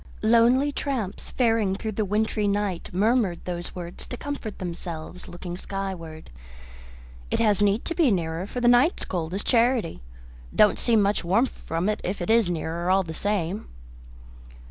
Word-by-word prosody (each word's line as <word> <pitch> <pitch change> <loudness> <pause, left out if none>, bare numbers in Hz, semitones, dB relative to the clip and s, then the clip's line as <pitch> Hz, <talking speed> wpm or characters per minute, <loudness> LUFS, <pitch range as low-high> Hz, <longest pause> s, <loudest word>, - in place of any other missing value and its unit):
Lonely 235 +5 +4
tramps 255 -9 -3
faring 225 -6 +2
through 220 +2 -4
the 215 +1 -1
wintry 210 +1 0
night 200 -3 -1
murmured 205 -1 +1
those 175 -1 -4
words 175 -1 -7
to 245 - -5
comfort 285 -7 -5
themselves 175 -1 -6
looking 175 0 -7
skyward. 180 - -6 1.0
"It - - 0
has 210 -2 +3
need 205 +2 +2
to - - -1
be 330 -5 +3
nearer, 170 -2 -1
for 245 - -4
the 240 - +3
night's 245 +8 +4
as - - -8
cold 165 -3 -3
as 200 - -2
charity. 235 - +2 0.5
Don't 210 - +5
seem 225 -4 +3
much 200 0 +1
warmth 215 +9 +1
from 165 +4 -1
it 215 - 0
if 190 +3 -3
it 175 +4 -1
is 225 -5 +4
nearer, 170 +1 -2
all 190 +1 +4
the 160 -2 -6
same." 200 +1 -2
200 Hz, 165 wpm, -25 LUFS, 175-230 Hz, 1.0 s, Don't